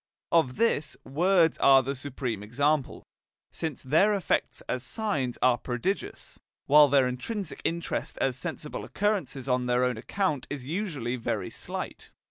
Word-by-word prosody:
Of 160 -7 +3
this, 175 -10 0
words 170 +4 +3
are 135 -1 +6
the 135 +2 -2
supreme 130 -5 -4
example, 140 +6 0 0.5
since 160 -5 -4
their 165 +10 +4
effects 185 -7 -1
as 125 - -2
signs 135 - -2
are 125 -1 +4
prodigious, 125 +11 -4 0.3
while 150 +1 +7
their 135 -2 +4
intrinsic 170 - -4
interest 170 +1 -2
as 130 -2 +1
sensible 150 +4 -6
occurrences 200 -10 -1
on 125 -1 +1
their 125 +1 +2
own 125 -2 0
account 155 - -1
is 140 -3 -5
usually 145 - -2
very 115 - -3
slight. - - -6
140 Hz, 140 wpm, -28 LUFS, 125-170 Hz, 0.5 s, while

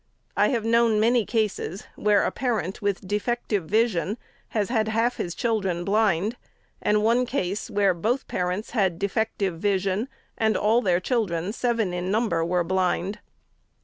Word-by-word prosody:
I - - +4
have 230 -4 -1
known 230 -1 +3
many 230 0 +3
cases, 210 -4 -1
where 210 -1 +3
a - - 0
parent, 220 -8 -2
with 200 -2 -2
defective 210 -2 -1
vision, 210 -1 +1 0.3
has 210 -3 -1
had 220 -3 +1
half 230 +3 +1
his 175 - -3
children 195 -7 -1
blind; 210 +1 +1 0.4
and 210 0 +2
one 240 +3 +3
case, 210 -3 -2
where 200 -3 +2
both 225 +10 -1
parents 180 +4 -2
had 190 -7 +1
defective 200 -3 -1
vision, 200 +3 0 0.3
and 220 -1 +2
all 220 +3 +3
their 180 -6 +2
children, 190 -4 -1
seven 230 -6 0
in 180 +1 -2
number, 205 -6 +1
were 175 +1 +1
blind. 185 +2 0
210 Hz, 150 wpm, -25 LUFS, 185-225 Hz, 0.4 s, I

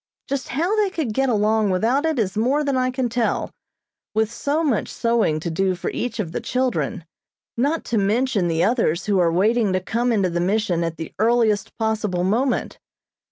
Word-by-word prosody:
Just 275 -2 -3
how 340 - 0
they 420 -2 +2
could 310 - -3
get 270 +3 +1
along 215 -1 +2
without 235 +11 +1
it 320 -3 -1
is 200 -5 -1
more 260 +7 +1
than 280 -2 0
I 255 0 +1
can 255 -1 -1
tell, 235 -1 -1 0.6
with 220 0 +1
so 290 +6 -1
much 270 -9 0
sewing 230 -10 +1
to 170 - -3
do 185 +3 0
for 180 - -4
each 235 -1 -4
of 175 -6 -2
the - - -3
children, 250 -8 -1 0.5
not 285 +7 0
to 230 - 0
mention 210 -1 +1
the 165 0 +1
others 205 -7 +1
who 200 -2 +2
are 170 -2 +3
waiting 210 +4 +2
to 185 - +2
come 235 +6 -1
into 195 -5 +1
the 175 - -1
Mission 185 -2 0
at 165 -1 -3
the 160 - -7
earliest 220 -2 +2
possible 215 -5 -1
moment. 235 +8 0
220 Hz, 195 wpm, -22 LUFS, 190-255 Hz, 0.6 s, are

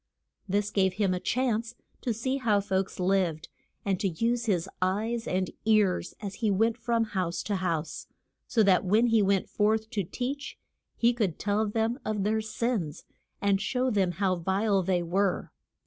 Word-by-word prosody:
This 205 +2 0
gave 190 -3 +2
him 195 -1 +1
a 180 - -1
chance 235 0 -1 0.3
to 245 - -1
see 260 +5 -1
how 220 -6 +2
folks 190 -1 -2
lived, 180 -4 +1 0.4
and 195 -3 0
to 200 - +1
use 235 +7 0
his 185 -5 +1
eyes 220 +5 0
and 185 0 -1
ears 210 -5 +2
as 200 -2 -5
he 220 - +2
went 225 +3 +2
from 235 -1 0
house 185 -5 -2
to 205 -2 -1
house, 165 -4 -2 0.4
so 230 -3 +3
that 190 -3 +4
when 210 +5 +3
he 225 -2 +4
went 195 -1 +2
forth 220 +1 +1
to 200 - -1
teach 270 - -4 0.4
he 235 +1 +4
could 210 -9 -1
tell 210 +1 0
them 225 +4 0
of 215 -2 -1
their 220 +2 +1
sins, 215 -7 -2 0.4
and 200 -1 +3
show 255 +3 0
them 190 -4 +1
how 185 0 +1
vile 195 +3 +1
they 180 -1 +1
were. 190 +3 0
205 Hz, 175 wpm, -28 LUFS, 190-225 Hz, 0.4 s, that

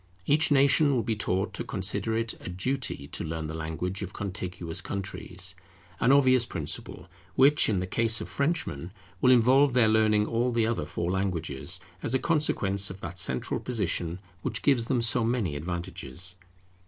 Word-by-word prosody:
Each 155 +3 +4
nation 140 0 +4
will 120 - +1
be 115 -2 -1
taught 100 -1 -1
to - - -3
consider 100 +2 -2
it 115 0 -2
a - - -7
duty 95 - -3
to - - -5
learn 80 0 -4
the 80 - -5
language 80 +4 -4
of 95 -1 -6
contiguous 90 -4 -3
countries; 95 -1 -4 0.5
an 125 - +4
obvious 130 -3 +5
principle, 80 -4 -3 0.3
which, 140 +1 +5
in 105 - +1
the 90 - -1
case 115 +4 +2
of - - -5
Frenchmen, 140 - -2 0.3
will 125 - +5
involve 130 +3 +5
their 120 -3 +5
learning 110 -1 +3
all 120 +3 0
the 115 -2 +2
other 115 0 -1
four 85 +1 -2
languages, 90 -3 -2 0.2
as 125 - -1
a - - +5
consequence 105 - +1
of 95 - -8
that 85 +1 -5
central 65 -7 +1
position 90 -7 -1 0.2
which - - -3
gives 130 -5 +3
them 120 -1 0
so 115 +1 +2
many 110 -9 0
advantages. 85 0 -5
100 Hz, 170 wpm, -27 LUFS, 90-125 Hz, 0.5 s, obvious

